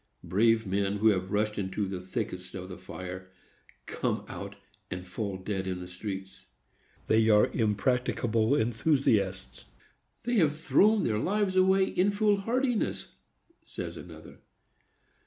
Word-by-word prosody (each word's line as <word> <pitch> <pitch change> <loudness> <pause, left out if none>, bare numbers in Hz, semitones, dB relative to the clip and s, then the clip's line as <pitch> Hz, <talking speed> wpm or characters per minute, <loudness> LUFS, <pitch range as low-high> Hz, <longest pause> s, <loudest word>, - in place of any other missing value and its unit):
Brave 110 +6 +3
men, 100 +1 0
who 110 +2 +4
have 95 -2 0
rushed 105 0 0
into 100 +1 -2
the 95 -1 -4
thickest 90 0 -5
of 95 -1 -6
the 90 - -7
fire, 95 0 -8 0.6
come - - -2
out, 100 0 -7 0.3
and 90 0 -5
fall 95 +1 -4
dead 95 0 -3
in 90 -1 -3
the 90 - -7
street. 95 +1 -7 0.6
"They 110 0 +3
are 105 -1 +5
impracticable 115 +2 +1
enthusiasts. 110 - 0 0.6
They 240 0 0
have 150 -5 +3
thrown 210 +6 +4
their 105 -2 0
lives 195 - 0
away 190 +1 +5
in 190 +1 +1
foolhardiness," 215 +4 0 0.5
says - - -6
another. - - -11
105 Hz, 130 wpm, -29 LUFS, 95-150 Hz, 0.6 s, are